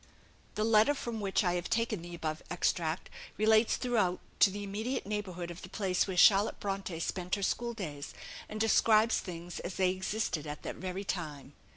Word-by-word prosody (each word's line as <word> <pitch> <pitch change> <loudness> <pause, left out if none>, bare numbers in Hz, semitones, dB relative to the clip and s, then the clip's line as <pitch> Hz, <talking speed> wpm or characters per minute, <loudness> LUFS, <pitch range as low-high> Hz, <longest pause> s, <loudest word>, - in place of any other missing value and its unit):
The 215 - 0
letter 220 +5 +5
from 235 -5 -4
which 195 +1 +1
I 175 -2 +2
have 175 0 -2
taken 225 -4 0
the 175 0 -8
above 155 -1 -3
extract 170 -1 0 0.3
relates 220 +1 +4
throughout 215 -8 +1 0.2
to - - +7
the 205 +1 -5
immediate 215 +6 -3
neighbourhood 185 -4 -4
of 170 - -9
the 185 - -9
place 190 -2 0
where 190 -2 -3
Charlotte 200 +3 +6
Bronte 195 -4 -3
spent 180 +2 -1
her 200 - -4
school 235 +3 -1
days, 145 -9 -6 0.3
and 215 - -5
describes 225 0 +4
things 175 -1 -7
as 175 - -5
they 185 -1 +3
existed 185 -4 -2
at 150 0 -6
that - - -5
very 185 +2 -4
time. 150 -7 -5
190 Hz, 185 wpm, -32 LUFS, 175-215 Hz, 0.3 s, to